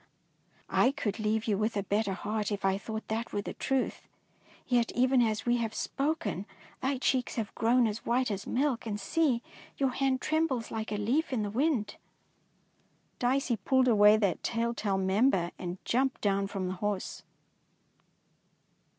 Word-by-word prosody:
^' 265 +3 +3
could 205 0 -2
leave 215 +1 0
you 205 -3 +1
with 215 0 0
a 200 - 0
better 200 +1 0
heart 210 +3 -2
if 205 -1 -2
I 195 0 +2
thought 220 +1 -6
that 225 +2 -2
were 205 - -2
the - - -5
truth, 270 -1 -2 0.6
yet 240 -2 +2
even 255 +1 +3
as 220 -2 0
we 240 0 +3
have 225 -2 -2
spoken 285 - -2 0.3
thy 265 +1 0
cheeks 255 -1 0
have 225 -3 -3
grown 240 +2 +3
as 215 0 -2
white 245 0 +1
as 200 -1 -4
milk, 260 -3 0
and 205 -1 -3
see, 250 +3 +1 0.3
your 270 -2 +1
hand 265 0 +1
trembles 310 -7 0
like 220 0 -4
a 210 - -1
leaf 250 +11 0
in 235 -5 0
the 205 - -3
wind! 245 -4 0 1.2
Dicey 250 -1 +1
pulled 260 +6 +2
away 210 -2 +6
that 200 -5 0
telltale 230 -4 -1
mem 190 +7 +3
ber 175 -7 0
and 180 0 -4
jumped 260 +2 +1
down 200 -1 +1
from 195 -2 -3
the 185 - -2
horse. 205 -2 -2
225 Hz, 165 wpm, -30 LUFS, 205-255 Hz, 1.2 s, away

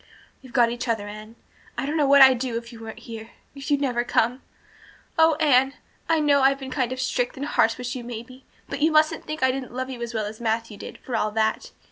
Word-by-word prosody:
"We've 260 - -14
got 240 -2 +3
each 240 +1 -4
other, 220 -3 -1
Anne. 215 +2 -10 0.4
I - - -1
don't 295 +3 -2
know 295 -3 +2
what 280 0 +8
I'd 260 -2 +6
do 245 -2 -2
if 235 +1 -8
you 230 - -11
weren't 225 +1 -9
here 225 -1 -8 0.2
if 275 +1 -8
you'd 285 -1 +2
never 245 -4 0
come. 245 +2 +1 0.7
Oh, 320 -1 +5
Anne, 275 -3 +3 0.3
I 325 -1 +3
know 290 -2 +3
I've 270 +1 +4
been 265 -1 -8
kind 255 -3 -1
of 255 - -4
strict 250 -1 -1
and 280 - -3
harsh 225 -5 +2
with 250 0 -4
you 250 - -5
maybe 245 +2 -9 0.2
but - - -5
you 315 +2 +4
mustn't 310 0 +2
think 305 -2 -4
I 260 - +5
didn't 255 -2 -6
love 260 +1 -3
you 245 -2 -7
as 235 0 -5
well 215 -1 -1
as 215 +2 -8
Matthew 225 -1 -1
did, - - -9
for 250 - -3
all 215 -1 +1
that. 220 0 0
255 Hz, 245 wpm, -24 LUFS, 230-275 Hz, 0.7 s, what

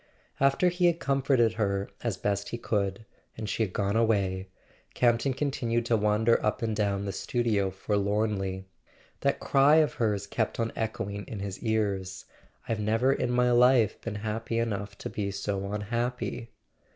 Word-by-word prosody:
After 140 +6 +4
he 175 0 +2
had 170 -1 +1
comforted 135 -5 +2
her 100 -3 -1 0.2
as 115 -6 -1
best 100 0 -1
he 120 - -4
could, 100 -2 -2 0.3
and 110 -1 -4
she 105 - -2
had 105 -4 0
gone 100 +2 -1
away, 100 -5 +1 0.5
Campton 120 +2 +3
continued 120 -5 -1
to 120 - +2
wander 105 +2 +2
up 105 +2 0
and 110 -1 0
down 100 -1 0
the 100 - -2
studio 105 -2 0
forlornly. 100 -1 -1 0.5
That - - +1
cry 140 +2 +4
of 155 -2 +4
hers 105 -3 +1
kept 110 +3 -2
on 115 0 -1
echoing 105 -2 -3
in 110 - -6
his 100 -1 -5
ears: 100 -4 -1 0.4
"I've 115 -1 -1
never 115 +5 +2
in 125 - -1
my 125 0 +3
life 120 -3 +4
been 115 -2 -5
happy 115 +1 -2
enough 100 -3 -2
to - - -6
be 100 -2 -2
so 100 0 -3
unhappy!" 115 +2 -3
110 Hz, 165 wpm, -28 LUFS, 100-120 Hz, 0.5 s, After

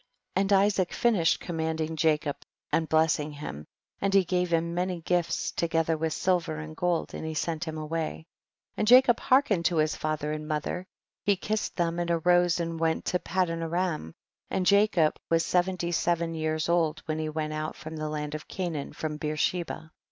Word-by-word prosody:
30. 190 - +3
And 200 +1 +2
Isaac 195 -2 +3
finished 210 -9 +2
command 160 -2 -3
ing 160 0 -2
Jacob 150 -2 +1 0.3
and 160 -2 +1
blessing 155 -1 +2
him, 75 - -7 0.3
and 195 0 +1
he 195 - +6
gave 180 0 0
him 170 0 +1
many 180 0 -1
gifts, 175 0 0
together 165 -1 +1
with 160 0 -1
silver 175 -2 0
and 155 0 -7
gold, 175 0 -1
and - - -5
he 160 0 -4
sent 165 +2 -2
liim 160 0 -4
away; 155 - -3 0.5
and 215 - -1
Jacob 250 0 +7
hearkened 240 -10 +3
to 175 - +2
his 155 -1 +2
father 155 -1 -2
and 155 0 -4
mother; 155 +4 -3 0.4
he 200 - +3
kissed 215 +3 -2
them 170 -1 0
and 175 0 -1
arose 175 +1 +3
and 165 -1 -3
went 160 0 0
to 180 - +1
Padanaram, 165 - -1 0.4
and 185 - -1
Jacob 200 -5 +4
was 165 -1 +3
seventy 180 -1 0
seven 170 0 0
years 155 -1 -1
old 165 -2 +1
when 155 0 -2
he 155 0 -2
went 155 0 -3
out 155 0 -3
from 160 +1 -8
the 155 -1 -3
land 150 -1 -4
of 155 0 -6
Canaan 170 -6 -4
from 155 -1 -4
Beersheba. 160 +2 -2
165 Hz, 180 wpm, -28 LUFS, 155-180 Hz, 0.5 s, Jacob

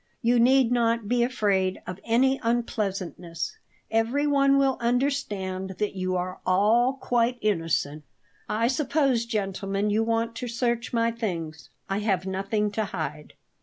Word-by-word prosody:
"You 240 +1 +4
need 255 0 +4
not 230 -2 +1
be 245 +2 +2
afraid 200 -6 +1
of 180 +1 -6
any 260 +4 +2
unpleasantness; 195 -7 -2 0.3
everyone 275 +5 +3
will 270 -1 +2
understand 210 -7 -1
that 210 -1 -1
you 185 -1 -1
are 185 +1 -3
all 220 +7 +3
quite 245 -2 0
innocent. 165 -7 -1 0.5
I 225 +2 +1
suppose, 265 -3 +1
gentlemen, 195 -1 -1
you 220 +2 +2
want 230 0 0
to 245 - -4
search 235 0 -1
my 230 -1 +2
things. 170 -9 -5 0.2
I 195 +1 -1
have 195 -4 0
nothing 195 +2 -1
to 215 +1 -1
hide." 150 -5 -5
225 Hz, 135 wpm, -26 LUFS, 190-245 Hz, 0.5 s, You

